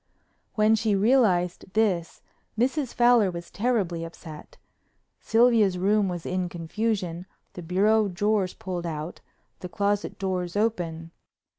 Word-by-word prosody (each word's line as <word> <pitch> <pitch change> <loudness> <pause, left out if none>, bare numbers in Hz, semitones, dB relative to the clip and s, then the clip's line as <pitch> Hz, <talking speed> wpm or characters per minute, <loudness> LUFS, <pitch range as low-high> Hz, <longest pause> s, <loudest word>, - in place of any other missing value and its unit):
When 215 0 +4
she 220 -1 +1
realized 195 -6 +2
this 190 -6 0 0.3
Mrs. 265 +3 0
Fowler 240 -4 +4
was 170 -1 -8
terribly 200 -7 -1
upset. 165 -2 -11 0.6
Sylvia's 225 -5 +3
room 200 +2 +2
was 175 -2 -5
in 185 -1 -2
confusion, 180 0 -3 0.3
the 180 - -8
bureau 205 +5 +2
drawers 200 0 0
pulled 175 -2 -5
out, 155 +1 -6 0.4
the 180 - -7
closet 205 +2 -1
doors 185 -2 -3
open. 170 -7 -2
190 Hz, 120 wpm, -26 LUFS, 175-220 Hz, 0.6 s, When